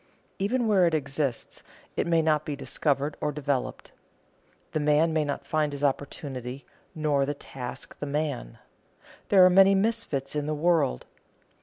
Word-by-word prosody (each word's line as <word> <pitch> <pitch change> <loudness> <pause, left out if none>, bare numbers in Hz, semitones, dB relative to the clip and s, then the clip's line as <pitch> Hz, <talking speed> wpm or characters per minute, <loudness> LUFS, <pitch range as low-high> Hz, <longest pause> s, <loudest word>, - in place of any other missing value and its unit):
Even 235 +5 0
where 190 -5 +4
it 165 - +1
exists, 140 -3 -3 0.3
it - - -1
may 165 -1 +3
not 155 -1 +2
be 150 - -4
discovered 140 +1 -1
or 150 - 0
developed. 140 -3 -3 0.8
The - - -1
man 150 +2 +3
may 155 -1 +2
not 140 -1 -4
find 155 0 0
his 145 0 -6
opportunity, 135 -2 -3 0.3
nor 150 -3 +1
the 145 +2 -2
task 125 -3 -7
the 145 - -4
man. 140 - -3 0.7
There 190 -2 +7
are - - +7
many 195 +1 +6
misfits 195 - -1
in 150 0 -1
the 155 - -1
world. 155 - +1
150 Hz, 155 wpm, -27 LUFS, 140-165 Hz, 0.8 s, There